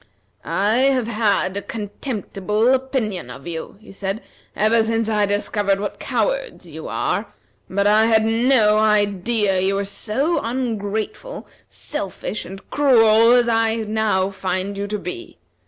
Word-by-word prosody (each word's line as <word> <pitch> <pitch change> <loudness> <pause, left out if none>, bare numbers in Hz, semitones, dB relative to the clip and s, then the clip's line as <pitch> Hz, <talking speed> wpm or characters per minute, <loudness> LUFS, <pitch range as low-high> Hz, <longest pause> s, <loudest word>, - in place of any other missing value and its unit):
"I 210 +4 +1
have 260 -2 +2
had 210 -4 0
a 200 - -2
contemptible 215 -1 -2
opinion 250 - -2
of 130 +2 -10
you," 170 +3 -6
he 220 - -15
said, 195 +2 -4 0.3
"ever 220 +2 +3
since 225 0 0
I 210 -2 +1
discovered 205 -1 0
what 205 - -5
cowards - - -2
you - - -9
are, - - -2 0.4
but 200 +1 0
I 215 +2 +5
had 220 -1 +3
no 225 -2 +4
idea 210 0 +2
that 185 0 +1
you 195 +1 +1
were 200 0 -1
so 270 - -1
ungrateful, 225 - -4 0.2
selfish, 210 -5 -5
and 195 +2 -10
cruel, 230 -5 +5
as 245 -1 +4
I 225 -1 +2
now 215 -3 0
find 190 +1 -3
you 200 +1 -3
to 210 +1 -2
be. 350 - -8
215 Hz, 145 wpm, -21 LUFS, 200-230 Hz, 0.4 s, I